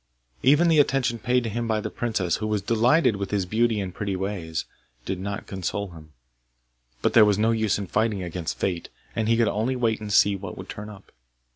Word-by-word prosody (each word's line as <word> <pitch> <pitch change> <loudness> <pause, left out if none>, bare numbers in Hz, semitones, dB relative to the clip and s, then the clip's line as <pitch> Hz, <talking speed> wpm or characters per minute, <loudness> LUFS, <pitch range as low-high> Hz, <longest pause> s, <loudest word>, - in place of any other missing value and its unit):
Even 150 +6 +5
the 160 -2 +4
attention 130 -4 +2
paid 125 0 +1
him 115 +1 -2
by 110 -1 +1
the - - -4
princess, 105 -8 -1
who 110 - -3
was 105 -2 -1
delighted 120 +1 +3
with 100 -1 -4
his 100 -3 0
beauty 110 +3 +1
and 95 -2 -4
pretty 100 0 -3
ways, 95 -4 -3 0.4
did 95 - -3
not 100 +1 -4
console 95 +1 -4
him, 80 -2 -13 0.9
but - - +2
there 115 - +8
was 105 -2 +3
no 110 +2 +3
use 110 -2 +1
in 100 - -4
fighting 105 0 0
against 85 -1 -4
fate, 90 -3 -2 0.3
and 110 -1 0
he 115 0 +3
could 115 -1 +3
only 115 +6 0
wait 115 -3 0
and 105 -1 -5
see 100 0 +5
what 95 -2 -7
would 95 - -9
turn 105 +1 -7
up. 100 -2 -14
105 Hz, 215 wpm, -25 LUFS, 95-115 Hz, 0.9 s, there